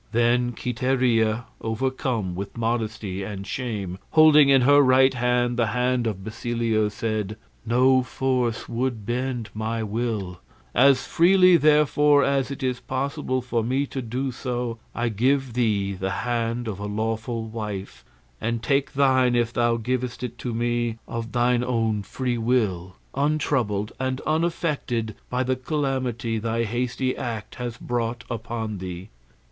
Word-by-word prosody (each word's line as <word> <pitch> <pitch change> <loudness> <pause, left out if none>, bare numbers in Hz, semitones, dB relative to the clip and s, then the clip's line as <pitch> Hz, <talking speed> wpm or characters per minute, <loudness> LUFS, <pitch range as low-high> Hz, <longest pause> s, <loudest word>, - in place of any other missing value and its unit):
Then 120 +1 +2
Quiteria, 120 -2 +1 0.2
overcome 115 -4 -1
with 100 +5 -6
modesty 110 -4 -2
and 100 0 -5
shame, 100 -8 -4
holding 155 -2 +7
in 135 -1 +6
her 145 +3 +6
right 130 0 +5
hand 120 0 +1
the 115 -2 +2
hand 125 +1 0
of 95 -3 -4
Basilio, 115 0 -1
said, 105 0 -3 0.3
"No 130 +3 +4
force 125 -2 -1
would 120 -3 -2
bend 120 -1 -2
my 110 +1 -2
will; 105 -4 -3 0.3
as 135 +2 +5
freely, 185 +1 +5
therefore, 150 -1 +4
as 135 -1 +1
it 140 0 -6
is 125 -1 -1
possible 130 0 -2
for 120 -2 -1
me 130 +5 0
to 135 -1 -5
do 130 +3 -3
so, 120 -2 -3 0.2
I 120 0 0
give 130 +4 +1
thee 105 -5 +1
the 95 0 -3 0.2
hand 120 0 -1
of 100 -3 -4
a 105 - -4
lawful 110 +2 -2
wife, 105 - -6 0.4
and 115 0 -2
take 140 +2 +1
thine 130 -3 +3
if 120 0 +1
thou 120 -1 +2
givest 125 +1 -3
it 120 -1 -5
to 125 - -3
me 120 0 -1
of 115 -1 -5
thine 120 0 +2
own 115 -4 0
free 120 +4 -3
will, 100 -7 0 0.2
untroubled 135 -8 0
and 130 0 -1
unaffected 155 -8 -1 0.2
by 125 +1 0
the 130 0 0
calamity 130 -5 -2
thy 115 +1 -1
hasty 125 +3 -1
act 115 -3 -5
has 120 -2 -4
brought 120 0 -2
upon 115 -2 -4
thee." 90 +1 -7
120 Hz, 145 wpm, -24 LUFS, 110-130 Hz, 0.4 s, holding